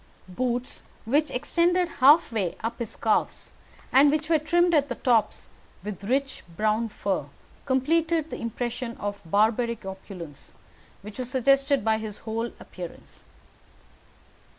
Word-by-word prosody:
Boots 245 +6 -3 0.2
which 295 +7 +2
extended 345 +7 +1
halfway 250 - +4
up 225 +2 -3
his 235 -3 -5
calves, 220 -2 0 0.4
and 280 +2 +7
which 305 +1 -1
were 320 - +5
trimmed 345 +3 +2
at 290 -3 +3
the - - -4
tops 235 -5 +1 0.4
with 205 -2 -6
rich 270 +4 -1 0.2
brown 215 +2 +1
fur, 195 -7 -2 0.4
completed 320 +4 +1
the - - -5
impression 235 +1 -4
of 205 0 -4
barbaric 220 +5 +1
opulence 190 -6 -9 0.5
which 210 +3 -10
was 250 -1 -3
suggested 275 0 +2
by 220 0 +2
his 215 -2 -6
whole 225 +1 -2
appearance. 180 -2 -10
240 Hz, 130 wpm, -26 LUFS, 215-285 Hz, 0.5 s, and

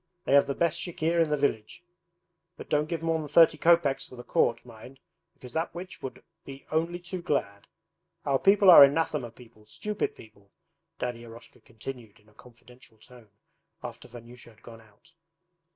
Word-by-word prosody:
They - - 0
have 140 0 +5
the 140 - -3
best 170 -1 0
chikhir 170 -1 -1
in 160 - -4
the 150 - 0
village. 140 +1 -2 0.7
But - - -11
don't 150 +1 +1
give 165 -2 -4
more 165 -1 0
than 155 - -6
thirty 165 +2 +5
kopeks 165 -5 +3
for - - -12
the 120 - -10
quart, 115 0 0
mind, 125 +3 -14 0.4
because 125 -1 -13
that 165 +2 -3
witch 180 +1 -9
would 130 - -8 0.2
be 135 0 -11
only 165 +3 -1
too 175 +1 -7
glad.... 100 - -3 0.6
Our 135 -1 +1
people 195 -1 +6
are 165 - +11
anathema 145 -3 +1
people; 115 -2 -19
stupid 210 - -4
people,' 100 -2 -18 0.5
Daddy 120 -1 -4
Eroshka 115 0 -13
continued 115 -1 -10
in 105 - -28
a - - -25
confidential 125 0 -19
tone 120 0 -17 0.5
after - - -9
Vanyusha 120 0 -13
had 110 +1 -23
gone 115 -1 -13
out. 110 +10 -23
135 Hz, 175 wpm, -27 LUFS, 115-165 Hz, 0.7 s, are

